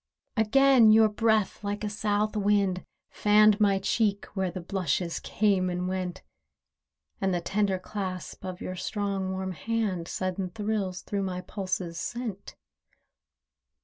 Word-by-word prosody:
Again 240 +1 +5
your 220 0 +6
breath, 215 -1 +1
like 205 +1 -3
a - - 0
South 210 +1 0
wind, 200 -3 +2 0.3
fanned 210 0 +5
My 200 -2 +4
cheek, 200 +1 0
where 190 -2 -1
the 180 +2 -6
blushes 180 -1 -1
came 195 -3 +1
and 180 0 -2
went; 185 -1 -3 1.0
And 190 -2 +1
the - - +1
tender 195 +2 0
clasp 185 0 -6
of 185 -1 -6
your 185 - -4
strong, 195 0 -2
warm 190 0 -3
hand 200 -3 -2
Sudden 185 0 -2
thrills 205 -2 -2
through 200 -1 -2
my 185 -2 -3
pulses 185 -4 -4
sent. 235 -5 -5
200 Hz, 135 wpm, -28 LUFS, 185-210 Hz, 1.0 s, your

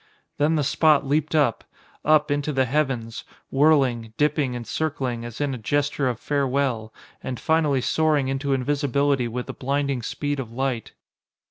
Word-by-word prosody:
Then 150 +2 +3
the 150 - +1
spot 150 +1 +3
leaped 150 +3 0
up 140 -7 +2 0.4
up 150 -1 +3
into 145 +1 0
the 130 -2 +2
heavens, 125 -4 -1 0.3
whirling, 135 -6 +3
dipping 145 -3 +1
and 120 -1 -5
circling 130 -7 -2
as 120 -1 -8
in 145 -2 0
a 125 - -5
gesture 145 +3 0
of 120 -2 -4
farewell, 135 -6 -1 0.3
and 125 -3 -5
finally 155 -4 +2
soaring 150 0 +1
into 135 +1 -2
invisibility 140 -1 +1
with 125 +2 -4
the - - -6
blinding 140 -1 -1
speed 145 +4 -3
of 120 -4 -5
light. 125 -2 -3
140 Hz, 155 wpm, -24 LUFS, 125-145 Hz, 0.4 s, Then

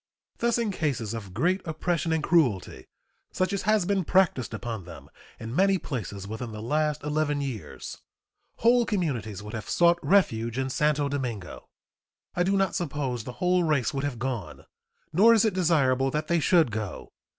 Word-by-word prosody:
Thus 235 0 +2
in 230 -3 0
cases 135 - -2
of 105 -5 -6
great 175 - +1
oppression 165 0 -1
and 160 -1 0
cruelty, 125 - +1 0.4
such 185 +2 -1
as 200 - -1
has 215 -4 +3
been 195 0 +1
practiced 170 - +2
upon 110 -4 -5
them 90 - -12 0.3
in 115 +2 -6
many 195 +2 +4
places 100 - -5
within 110 +2 -5
the 110 - -7
last 150 +5 -1
eleven 150 -1 0
years, 135 -6 -6 0.6
whole 240 +1 +4
communities 125 - -2
would 105 - -8
have 110 -2 -6
sought 170 0 +4
refuge 115 - +2
in 130 0 -1
Santo 150 0 +1
Domingo. 125 -9 -5 0.6
I 175 - -1
do 195 +2 +2
not 195 -2 +1
suppose 135 -8 -3
the 125 - -6
whole 180 +2 +1
race 150 -7 +1
would 135 0 -2
have 145 -4 -2
gone, 120 -9 -5 0.5
nor 225 +7 +6
is 220 - +4
it 220 - +1
desirable 140 -8 +2
that 150 +3 -2
they 170 0 +2
should 160 -5 +3
go. 105 -5 -5
145 Hz, 175 wpm, -27 LUFS, 115-180 Hz, 0.6 s, nor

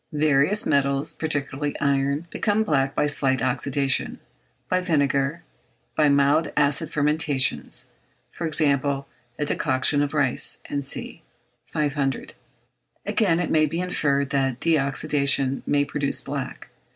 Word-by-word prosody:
Various 150 +6 +2
metals, 140 -1 +1
particularly 145 -2 -3
iron, 140 +2 0
become 215 0 +1
black 135 -8 0
by - - +2
slight 135 -3 0
oxydation, 130 +2 0 0.5
by 185 0 +1
vinegar, 145 -2 0 0.5
by 150 -2 +4
mild 140 +3 +3
acid 150 +2 +1
fermentations; 150 -3 0 0.5
for 170 - -4
example, 140 -2 0 0.3
a 150 - -1
decoction 145 0 +1
of 145 +1 -2
rice, 140 -4 +2 0.2
&c. 140 -1 -2 0.5
500. 145 -3 -1 0.7
Again, 180 -7 +1
it 175 - -1
may 155 -1 +4
be 165 +3 -3
inferred 140 -6 0
that 135 -2 +1
a - - -12
de 165 - +2
oxydation 140 -1 0
may 145 0 +2
produce 145 -1 -2
black. - - -6
145 Hz, 125 wpm, -24 LUFS, 140-155 Hz, 0.7 s, by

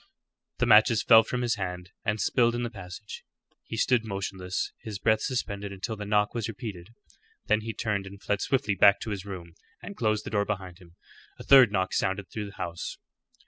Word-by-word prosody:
The - - +1
matches 110 +1 +5
fell 115 -2 +8
from 125 +2 -3
his 120 -1 0
hand 90 -2 -5
and 105 +1 -1
spilled 120 0 +2
in 120 - -2
the 120 - -3
passage. 90 +2 -9 0.4
He 110 - -6
stood 120 0 +2
motionless, 95 -3 -3
his 105 -2 -6
breath 110 +2 +2
suspended 100 -6 -3
until 100 +3 -4
the 105 -1 -7
knock 105 0 +2
was 115 -3 -2
repeated. 105 -5 -7 0.6
Then 110 +1 +2
he 110 0 -5
turned 100 -3 -2
and 100 0 -11
fled 105 0 -1
swiftly 135 -6 +1
back 100 +1 +6
to 110 - -4
his 100 -2 -5
room, 90 -4 -8 0.3
and 200 - -9
closed 110 - 0
the - - -6
door 100 -1 +1
behind 95 -4 -5
him. 85 -2 -18 0.4
A - - -9
third 130 -6 +7
knock 95 -2 0
sounded 95 0 -1
through 105 -2 -4
the 100 - -12
house. 85 0 -5
105 Hz, 200 wpm, -27 LUFS, 95-115 Hz, 0.6 s, fell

